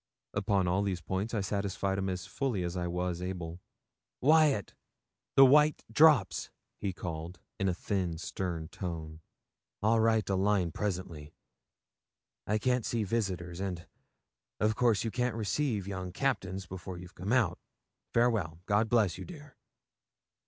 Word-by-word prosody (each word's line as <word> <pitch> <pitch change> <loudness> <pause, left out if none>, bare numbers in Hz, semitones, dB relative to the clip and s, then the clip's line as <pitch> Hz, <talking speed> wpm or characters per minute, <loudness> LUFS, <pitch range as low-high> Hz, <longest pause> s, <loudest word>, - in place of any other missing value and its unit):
Upon 100 -2 +1
all 90 +3 +2
these 95 -3 -1
points 95 +6 -3
I 105 - +1
satisfied 100 -1 -1
him 95 0 -1
as 90 -2 -3
fully 125 -10 -2
as 85 +1 -3
I 90 -1 -1
was 90 0 -2
able. 90 -2 -5 0.6
'Wyat 150 - +4 0.6
the 135 - +9
white 150 +3 +5
drops,' 145 - +5 0.3
he 100 - -1
called, 85 0 -6 0.2
in 95 -1 +2
a - - +1
thin, 90 -3 -2
stern 85 -1 -4
tone. 80 -3 -6 0.6
'I'll 115 +2 +4
write 110 -2 +3
a 100 - 0
line 95 -3 +2
presently. 90 -6 -4 1.1
I 105 - +2
can't 125 +2 +1
see 115 0 -1
visitors, 95 -5 -2
and, 90 -3 -4 0.7
of 110 +1 +2
course, 115 -4 +3
you 115 - -2
can't 125 0 0
receive 115 -1 -1
young 95 -2 -4
captains 95 -5 -1
before 90 0 -7
you've 90 0 -10
come 95 +5 -4
out. 115 -9 +2 0.5
Farewell! 105 -9 +1
God 105 +2 +2
bless 105 -7 +2
you, - - -6
dear.' 150 -5 -11
95 Hz, 145 wpm, -31 LUFS, 90-115 Hz, 1.1 s, the